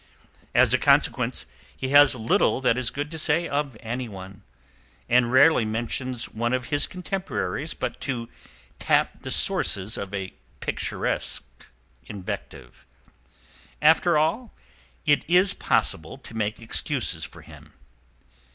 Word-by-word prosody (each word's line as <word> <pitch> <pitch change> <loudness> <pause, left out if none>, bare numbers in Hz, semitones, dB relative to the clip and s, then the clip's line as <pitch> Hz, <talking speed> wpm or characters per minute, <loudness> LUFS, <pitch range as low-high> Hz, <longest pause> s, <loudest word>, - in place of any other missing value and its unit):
As - - +5
a - - +3
consequence - - +2 0.3
he 130 - -3
has 145 -1 +6
little 115 +2 +2
that 125 -3 +3
is 125 -2 -1
good 145 +2 -5
to 160 - -3
say 165 +3 +1
of 140 -4 -2
anyone, 105 -5 -6 0.7
and 120 0 +3
rarely 130 0 +5
mentions 120 +3 -2
one 120 +2 -2
of 125 -1 -2
his 145 -1 +1
contemporaries 180 -4 -4
but - - -5
to 120 -4 -3 0.5
tap - - +1
the - - -7
sources 100 +3 +2
of 100 -1 -6
a 95 -1 -5 0.3
picturesque - - -2 0.6
invective. 100 -3 -8 1.0
After 160 +2 +4
all, 200 +10 -1 0.5
it 145 -1 +3
is 180 +2 +4
possible 80 +10 0
to 130 - -12
make 110 0 -2
excuses 115 - -1
for - - -10
him. - - -15
130 Hz, 125 wpm, -25 LUFS, 115-150 Hz, 1.0 s, has